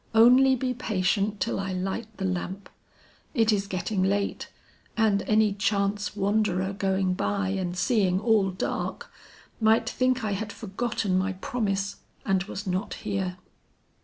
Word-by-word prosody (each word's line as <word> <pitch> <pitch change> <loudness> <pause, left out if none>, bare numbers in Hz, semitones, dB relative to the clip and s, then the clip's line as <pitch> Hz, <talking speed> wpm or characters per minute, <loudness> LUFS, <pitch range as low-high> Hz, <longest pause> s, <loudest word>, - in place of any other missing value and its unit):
Only 255 +4 +7
be 255 0 -1
patient 205 -3 0
till - - -1
I 195 -1 -3
light 190 +5 -3
the 195 - -2
lamp. 185 +1 -4 0.6
It 225 -3 +4
is 200 -1 0
getting 190 +1 -2
late 200 +2 0 0.5
and 215 -3 +3
any 215 -1 +3
chance 200 0 0
wanderer 200 -2 +1
going 190 -1 0
by 200 +1 -1
and 185 -2 -2
seeing 190 -4 +2
all 215 -3 +3
dark, 185 0 -4 0.5
might 225 0 +3
think 255 +1 +1
I 215 - -1
had 205 +1 -3
forgotten 205 -2 -1
my 190 +1 -1
promise 200 0 -2 0.3
and 190 -4 +2
was 205 +1 -6
not 185 +3 -2
here." 195 -3 -3
200 Hz, 140 wpm, -27 LUFS, 190-220 Hz, 0.6 s, Only